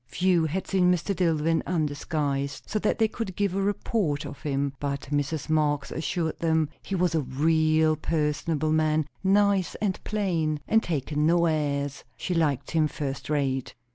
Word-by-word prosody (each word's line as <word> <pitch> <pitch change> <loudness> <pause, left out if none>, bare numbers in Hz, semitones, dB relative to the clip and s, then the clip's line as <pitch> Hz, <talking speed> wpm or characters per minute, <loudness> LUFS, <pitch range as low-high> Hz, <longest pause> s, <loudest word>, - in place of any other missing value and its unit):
Few 175 +4 +2
had 180 +5 -2
seen 180 -2 +3
Mr. 180 +3 0
Dillwyn 165 -2 +1
undisguised, 145 -3 -1
so 215 - -2
that 210 - +1
they 225 - +3
could 215 -4 -5
give 200 -1 0
a 195 - 0
report 195 -6 0
of 145 - -8
him; 140 -2 -1
but 140 -1 -2
Mrs. 145 +1 -1
Marx 150 -3 +1
assured 160 0 -2
them 160 -2 +1
he 195 - -4
was 180 -2 +1
"a 160 - +2
real 155 +3 +2
personable 155 0 -1
man; 155 -1 +2 0.2
nice 200 -1 +3
and 200 -3 -2
plain, 170 -8 0
and 225 - +4
takin' 150 - -1
no 170 +1 +4
airs. 145 -3 -1
She 180 - -2
liked 145 -5 0
him 160 -2 +3
first 140 -2 -5
rate." 135 -3 -1
155 Hz, 165 wpm, -26 LUFS, 145-180 Hz, 0.2 s, and